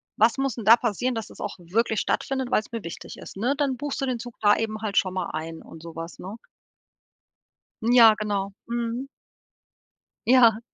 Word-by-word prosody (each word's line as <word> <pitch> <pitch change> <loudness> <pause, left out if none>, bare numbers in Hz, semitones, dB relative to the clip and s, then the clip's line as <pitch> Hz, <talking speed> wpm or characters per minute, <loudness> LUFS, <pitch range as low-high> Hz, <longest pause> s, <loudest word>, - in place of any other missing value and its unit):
„Was 225 +4 +3
muss 270 -3 -1
denn 230 - -6
da 225 +3 +8
passieren, 240 +2 -1
dass 225 - -4
das - - -13
auch 205 - -4
wirklich 215 +6 0
stattfindet, 265 -2 -1
weil's 215 -1 0
mir 230 -2 -5
wichtig 165 - -8
ist“, - - -10
ne? 245 +8 0
Dann 275 -3 0
buchst 290 +2 -4
du - - +1
den 250 -3 -2
Zug 245 0 -8
da 205 -1 +5
eben 215 -1 -3
halt 210 -3 -3
schon 185 -1 +2
mal 185 -2 -3
ein 160 +1 -5
und 165 0 -13
so 165 -1 -9
was, 165 +1 -7
ne? 200 +5 -7 1.5
Ja, 230 -1 +7
genau. 200 -2 -2
Mhm. 235 +2 -3 1.2
Ja. 235 -3 +6
225 Hz, 190 wpm, -25 LUFS, 200-245 Hz, 1.5 s, da